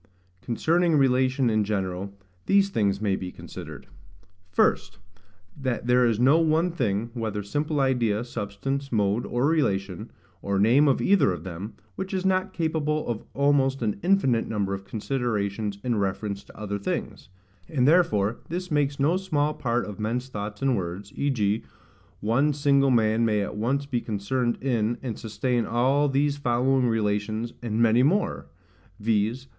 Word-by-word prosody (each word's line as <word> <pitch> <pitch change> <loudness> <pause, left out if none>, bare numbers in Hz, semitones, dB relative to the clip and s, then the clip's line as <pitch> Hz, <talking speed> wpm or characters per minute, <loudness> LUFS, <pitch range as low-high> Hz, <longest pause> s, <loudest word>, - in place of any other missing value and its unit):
Concerning 165 +6 +1
relation 130 -1 +2
in 110 -1 +2
general, 100 -2 -3 0.4
these 195 0 +4
things 100 - +1
may 100 -3 +1
be 90 -1 -5
considered: - - -10 0.6
First, 90 - +1 0.6
That 130 -4 -3
there 125 0 +4
is 115 -2 0
no 135 +6 +5
one 165 +2 +2
thing, 115 -7 -1
whether 110 -4 -3
simple 145 +8 -1
idea, 120 -5 +1
substance, 120 +5 -4
mode, 105 +1 +1
or 120 +2 0
relation, 105 - 0 0.3
or 100 0 -1
name 120 +9 +5
of 135 - +2
either 185 - +4
of 85 -3 -5
them, 95 +5 -7 0.2
which 190 0 -4
is 185 0 -2
not 190 0 +1
capable 155 -3 -1
of 115 -2 -3
almost 135 -2 +2
an 105 -2 -1
infinite 170 -11 +2
number 100 -3 -1
of 95 0 -6
considerations 105 -3 -2
in 120 -3 0
reference 100 +1 -2
to - - -16
other 100 -1 -4
things: 100 - -4 0.4
and 130 -4 +2
therefore 115 - +3
this 180 +1 -4
makes 145 -1 +1
no 155 +6 +3
small 150 -6 0
part 120 -3 -1
of 105 -1 -8
men's 120 +4 -2
thoughts 105 0 -6
and 135 -2 +3
words: 95 +1 -5
v.g. 115 -7 0 0.6
one 135 +8 +2
single 140 -1 +3
man 115 -2 +3
may 105 -2 +2
at 100 - -4
once 130 +6 -1
be 125 -4 -2
concerned 120 +3 -1
in, 120 -3 0
and 120 -4 -4
sustain 120 +2 -1
all 135 +6 +2
these 140 +1 +1
following 130 0 +2
relations, 110 +1 -1
and 115 -2 -2
many 115 +1 +4
more, 180 +10 +1 0.5
viz. 110 +4 0
120 Hz, 155 wpm, -25 LUFS, 105-140 Hz, 0.6 s, no